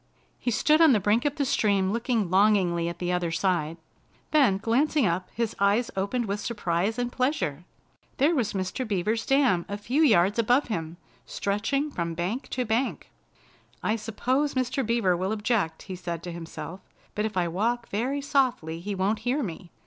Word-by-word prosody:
He - - -1
stood 300 +7 +3
on 320 -4 +7
the 215 - +3
brink 210 +6 +1
of 290 -1 0
the 285 -3 0
stream 200 -6 +2
looking 230 -4 0
longingly 185 -4 +3
at 170 - -7
the 180 0 -2
other 180 -1 0
side. 165 -2 0 0.5
Then, 270 -11 +4
glancing 260 +6 +2
up, 180 +1 -1
his 230 -1 -2
eyes 205 +4 +2
opened 200 +6 -1
with 200 0 -2
surprise 205 -1 -1
and 245 0 -2
pleasure. 250 - -1 0.5
There 290 +5 +3
was 240 -9 0
Mr. 190 +6 -2
Beaver's 215 +3 -1
dam 270 -11 +3
a 205 - -3
few 245 +9 0
yards 205 - +4
above 245 +4 +2
him, 165 -4 -4 0.3
stretching 250 +9 -1
from 170 -7 -3
bank 185 - -3
to 250 -1 -2
bank. 235 +4 -1 0.7
"I 215 - +1
suppose 250 +7 -1
Mr. 260 +1 0
Beaver 225 -6 +2
will 185 +3 -2
object," 210 -7 -1
he 190 - -6
said 170 -2 -5
to 175 - -5
himself, 170 +2 -7 0.3
"but 210 - -1
if 215 -3 -4
I 175 -1 +2
walk 230 +7 -1
very 255 +7 -1
softly 255 - 0
he 200 +3 -4
won't 200 +3 0
hear 250 +6 0
me. 175 -2 -7
210 Hz, 180 wpm, -26 LUFS, 180-245 Hz, 0.7 s, on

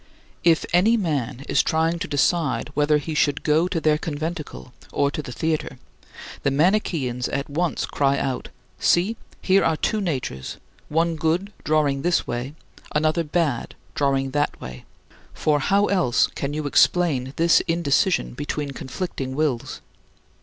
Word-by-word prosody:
If 165 -2 +4
any 210 +7 +4
man 140 - -2
is - - +3
trying 165 +2 0
to - - -3
decide 145 0 +1
whether 150 +1 +3
he 150 +2 -4
should 145 -1 +1
go 155 +3 +3
to 180 -2 -1
their 155 -1 +2
conventicle 155 -4 -5 0.2
or 140 0 +1
to 150 - -4
the 135 - -8
theater, 155 -2 -2 0.6
the - - +1
Manicheans 145 - +1
at 140 +1 -2
once 165 +3 -1
cry 140 -1 +1
out, 130 -2 -3 0.3
"See, 185 +6 +2 0.3
here 195 +1 +4
are 160 -1 +2
two 215 +6 0
natures 130 - -3 0.3
one 165 +1 +1
good, 170 +6 0
drawing 150 -3 +1
this 175 +3 +1
way, 120 +5 -4 0.4
another 155 +2 +2
bad, 150 -5 -1 0.2
drawing 135 -1 0
back 145 +1 0
that - - -21
way; 65 -1 -9 0.5
for 150 -1 +1
how 200 +8 +3
else 180 -12 +2
can 140 - -3
you 150 0 -3
explain 145 -3 +2
this 165 0 +4
indecision 170 +2 +1
between 145 +1 -4
conflicting 135 -1 -5
wills?" 140 -6 -1
150 Hz, 150 wpm, -23 LUFS, 140-170 Hz, 0.6 s, If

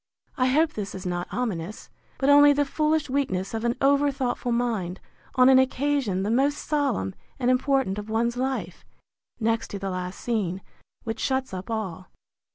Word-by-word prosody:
—I 255 -3 +2
hope 310 +4 +3
this 200 -3 -5
is 185 - -7
not 175 0 -2
ominous; 215 -5 -4 0.3
but 270 - 0
only 290 0 +8
the 290 0 +1
foolish 305 +2 0
weakness 230 -9 -1
of 225 0 -3
an 235 0 +1
over 280 +1 +4
thoughtful 250 -2 -2
mind, 225 -7 -1 0.4
on 255 -1 +6
an 265 0 +7
occasion 260 -7 +1
the 205 - -1
most 275 +5 +2
solemn 280 - -1 0.2
and 250 -1 +2
important 255 -6 +1
of 210 +1 -8
one's 235 +2 0
life, 260 +1 -3 0.6
next 230 0 0
to 200 - -6
the 195 -1 -4
last 180 0 -5
scene, 195 -6 -2 0.4
which 225 0 -4
shuts 265 -4 -1
up 185 +2 -6
all. 190 -5 -4
240 Hz, 170 wpm, -25 LUFS, 195-275 Hz, 0.6 s, only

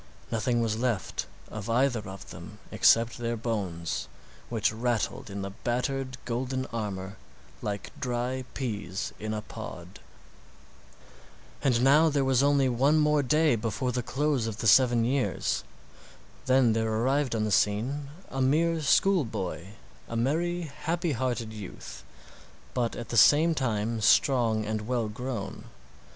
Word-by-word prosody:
Nothing 120 +1 +1
was 110 -1 -1
left 120 -7 -1 0.2
of 110 0 -6
either 125 +1 +2
of 95 0 -10
them - - -10
except 115 +1 +4
their 120 0 -2
bones, 85 - -3 0.4
which 110 -1 +1
rattled 115 -1 -1
in 100 0 -5
the 100 - -5
battered, 130 +4 -2
golden 130 +2 -2
armor 100 -4 -4 0.4
like 100 -1 -4
dry 125 +1 -2
peas 105 -7 -3
in 110 0 -4
a 105 -1 -3
pod. 90 -8 -9 1.6
And 125 -3 +2
now 150 +4 +6
there 140 -2 +1
was 130 -1 +3
only 140 -1 +3
one 135 +5 +3
more 150 -1 +3
day 150 +1 +3
before 115 +3 -2
the 125 0 -1
close 135 -1 0
of 110 -2 -4
the 110 - -4
seven 120 0 +5
years. 130 +2 0 0.8
Then 130 -3 +4
there 110 0 0
arrived 130 +3 +1
on 110 - 0
the 105 - -1
scene 125 +9 +1 0.2
a 135 - -2
mere 160 +5 +2
school 185 +4 +4
boy—a 85 - -7
merry, 170 +9 0
happy 165 +3 -2
hearted 120 -3 -2
youth, 105 -4 -9 0.7
but 120 -2 -1
at 120 - -7
the 120 - -1
same 155 +9 +6
time 115 -5 -1
strong 115 -3 +3
and 110 0 -3
well 120 -3 0
grown. 115 -2 -5
120 Hz, 140 wpm, -28 LUFS, 110-135 Hz, 1.6 s, now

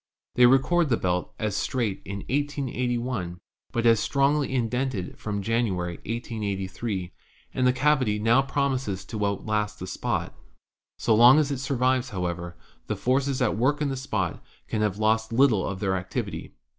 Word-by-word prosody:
They 125 0 +6
record 145 +6 +3
the 115 - +3
belt 90 0 -1
as 105 -3 -2
straight 110 -4 -1
in 100 0 -5
188 135 -3 -1
1, 110 -8 -3 0.3
but 120 0 -1
as 115 -2 +6
strongly 140 +3 +1
indented 125 -5 -1
from 100 -2 -3
January, 95 -6 -1
1883; 100 -4 -4 0.4
and 130 0 +2
the - - +5
cavity 130 -5 +2
now 115 +5 +4
promises 135 -8 -1
to 110 -2 -4
outlast 105 +1 -1
the 95 - -6
spot. - - -2 0.6
So 115 - +2
long 120 +5 +8
as 150 -2 +2
it 135 - -2
survives, 130 -1 +1
however, 85 -4 -4 0.3
the - - -1
forces 130 +1 +1
at 110 - +1
work 135 +7 +1
in 150 -2 0
the 135 - -2
spot 110 -10 -3 0.2
can 110 - -2
have 105 -2 0
lost 110 +1 +1
little 115 -5 +3
of 95 -1 -4
their 95 -1 0
activity. 95 0 -4
115 Hz, 160 wpm, -26 LUFS, 100-130 Hz, 0.6 s, long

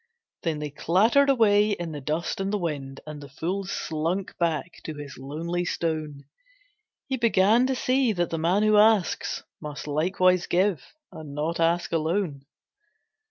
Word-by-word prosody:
Then 165 -3 -1
they 150 -1 -5
clattered 220 - +3
away 210 -5 +4
in 175 -4 -4
the 145 -2 -6
dust 155 +7 -2
and 195 +1 -1
the 210 - +1
wind, 140 -7 -4
And 150 -1 -8
the 140 - -10
fool 180 +8 -3
slunk 170 +2 -3
back 170 0 -1
to 155 - -5
his 145 -1 -8
lonely 165 +6 -3
stone; 155 -5 -3 0.8
He 265 -1 -2
began 230 +1 +4
to 265 - 0
see 255 -1 +2
that 175 -2 -1
the 165 - -2
man 180 +6 +2
who 215 0 +4
asks 210 -4 +3 0.2
Must 150 -1 -6
likewise 180 +4 +2
give 185 -4 +1 0.3
and 150 -3 -9
not 160 +3 -2
ask 170 +1 +1
alone. 160 -3 -1
170 Hz, 160 wpm, -26 LUFS, 155-200 Hz, 0.8 s, away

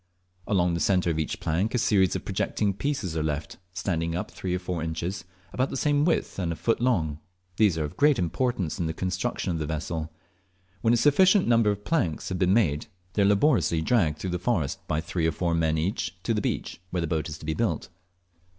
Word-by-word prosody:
Along 90 -4 +2
the 85 - -1
centre 90 +1 +2
of 80 - -2
each 80 - -2
plank 95 +10 0
a - - +3
series 100 -5 +3
of - - -4
projecting 100 -2 0
pieces 105 - -2
are 80 - 0
left, 75 0 -3
standing 85 -3 -2
up 90 - -4
three 90 -1 -3
or - - +1
four 90 -2 -4
inches, 85 +4 -3 0.3
about 130 +2 0
the - - -4
same 145 +1 +2
width, 165 - 0
and 85 -3 -1
a - - -2
foot 115 +6 0
long; 80 -12 +1 0.4
these 100 -7 +4
are 80 - 0
of 75 - -6
great 145 -2 +4
importance 95 -1 -1
in 85 - 0
the 80 - -3
construction 90 0 -2
of 85 - -2
the 75 - -2
vessel. 80 +1 -3 0.7
When 115 - +3
a - - +2
sufficient 185 - +5
number 115 -2 +4
of 105 0 -3
planks 115 - 0
have 95 -1 -3
been 90 -1 +3
made, 85 -9 +2 0.3
they 105 - +1
are - - +5
laboriously 100 - +3
dragged 80 -9 +2
through 95 - -4
the 90 - -2
forest 90 - 0
by 75 +1 0
three 80 0 -1
or - - +2
four 85 +1 -1
men 80 -1 +1
each 90 +2 -2
to 115 - +1
the 105 - 0
beach, 85 - -3
where 90 -1 -1
the - - 0
boat 80 0 -1
is 75 - -6
to 75 - -11
be 80 - -1
built. 95 -6 -1
90 Hz, 225 wpm, -26 LUFS, 80-110 Hz, 0.7 s, sufficient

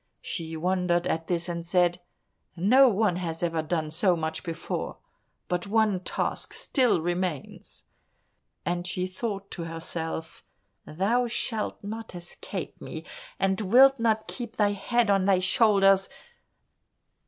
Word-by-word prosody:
She 165 -2 -4
wondered 180 0 +1
at 160 +1 -1
this 175 -1 0
and 170 -1 -3
said, 175 0 +2 0.5
"No 250 +10 +6
one 205 -4 +1
has 165 -2 -4
ever 165 -2 0
done 155 -1 -2
so 180 +3 +3
much 160 -1 -3
before, 165 -1 -4 0.5
but 180 +1 -2
one 215 -2 +2
task 180 - -3
still 250 - +2
remains," 175 -3 -4 0.8
and 175 0 -2
she 180 0 -2
thought 195 +1 -5
to 170 - -4
herself, 165 0 -5 0.4
"Thou 220 +10 +1
shalt 225 -3 -2
not 220 -1 -6
escape 175 0 -6
me, - - -7 0.3
and 190 +2 +1
wilt 260 +6 +6
not 220 -1 +1
keep 235 -3 -6
thy 205 -1 +3
head 220 +2 +1
on 195 -1 +3
thy 195 -1 +4
shoulders! 195 0 +4
185 Hz, 130 wpm, -27 LUFS, 170-215 Hz, 0.8 s, No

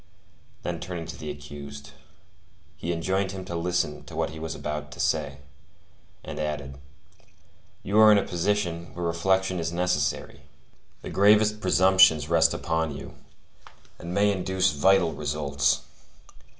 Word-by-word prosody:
Then 85 -2 -3
turning 85 -1 -6
to 85 - -7
the 75 - -7
accused, 70 -1 -9 0.8
he 85 - -4
enjoined 95 +3 -1
him 95 -1 -7
to 85 - -5
listen 85 -3 -1
to - - -11
what - - -1
he 80 - -9
was 80 0 -5
about 75 0 -5
to - - -13
say, 70 - 0 0.9
and - - -7
added: 75 -3 -4 1.0
"You 100 +3 +2
are 110 0 +8
in 105 - +6
a 100 - +2
position 85 -2 -2
where 90 0 -3
reflection 95 +2 +1
is 80 0 -2
necessary. 85 -5 -1 0.6
The - - -6
gravest 105 +1 +4
presumptions 95 -5 +5
rest 85 -1 +4
upon 80 -3 -2
you, - - -9 0.9
and 85 - -7
may 100 +2 +3
induce 95 -1 +1
vital 90 +3 +3
results. 70 -2 0
85 Hz, 140 wpm, -26 LUFS, 75-95 Hz, 1.0 s, are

